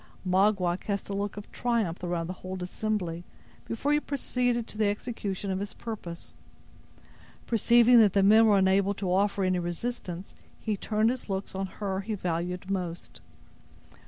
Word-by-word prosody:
Magua 185 -1 +2
cast 200 -1 -3
a - - -2
look 200 0 -3
of 205 - -9
triumph 225 -9 -1
around 175 -1 -1
the 180 - -4
whole 185 0 -5
assembly 180 -3 -2 0.4
before 275 +6 0
he 295 - +4
proceeded 250 -5 -1
to - - -12
the 215 -1 +2
execution 205 -3 -3
of 190 - -1
his 200 -1 -5
purpose. 190 -7 -7 1.1
Perceiving 235 +1 +5
that 210 -4 +5
the 195 - +4
men 220 +3 +7
were 205 -2 +5
unable 195 +1 +3
to 190 -2 -1
offer 200 +1 +2
any 185 -1 +2
resistance, 175 0 -4 0.3
he 215 -2 -1
turned 215 +3 +1
his 255 -3 -6
looks 195 +1 -3
on 190 0 -2
her 190 0 -3
he 215 +2 -3
valued 180 0 -3
most. 175 -3 -4
200 Hz, 160 wpm, -28 LUFS, 185-220 Hz, 1.1 s, men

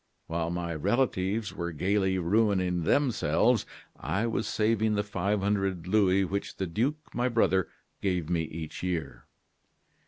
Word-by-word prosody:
While 80 0 -2
my 85 -1 -3
relatives 105 - 0
were 85 0 -3
gayly 95 +4 +1
ruining 90 -2 +1
themselves, 120 - +2 0.3
I 90 - -1
was 115 - -1
saving 110 0 +1
the 105 - +1
five 100 0 -1
hundred 95 -4 0
louis 95 -1 +3
which 100 +2 -4
the 95 - -1
duke, 125 - -2
my 125 +1 +1
brother, 95 -6 +2 0.3
gave 90 -5 0
me 85 -1 +1
each 80 0 -7
year. 80 -9 -3
95 Hz, 135 wpm, -28 LUFS, 85-105 Hz, 0.3 s, louis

